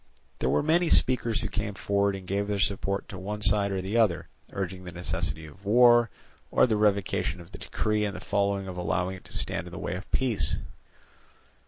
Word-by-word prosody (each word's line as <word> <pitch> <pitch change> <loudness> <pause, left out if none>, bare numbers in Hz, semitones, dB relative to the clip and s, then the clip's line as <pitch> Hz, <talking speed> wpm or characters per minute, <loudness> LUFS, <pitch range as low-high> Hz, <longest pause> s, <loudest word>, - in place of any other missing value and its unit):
There 65 - 0
were 70 - +2
many 165 +2 +3
speakers 120 -3 +3
who 110 - -2
came 100 0 -3
forward 100 +1 +1
and 95 -1 -8
gave 100 +2 -1
their 105 -1 -1
support 100 0 -1
to 95 - -7
one 105 +3 -4
side 100 0 +4
or 95 -1 -2
the 100 +5 -1
other, 105 -8 +2 0.2
urging 95 -1 -4
the 90 - -8
necessity 80 -2 -3
of 80 +6 -15
war, 120 +2 +6 0.4
or - - +4
the 115 -3 +1
revocation 100 -3 +1
of 85 +1 -13
the - - -10
decree 105 -1 -1
and 105 -1 -2
the - - -6
folly 100 -1 0
of 95 -1 -7
allowing 90 +2 -1
it - - -17
to - - -3
stand - - -3
in - - -10
the - - -8
way - - -3
of 95 +3 -7
peace. 125 -6 +1
100 Hz, 210 wpm, -27 LUFS, 95-105 Hz, 0.4 s, war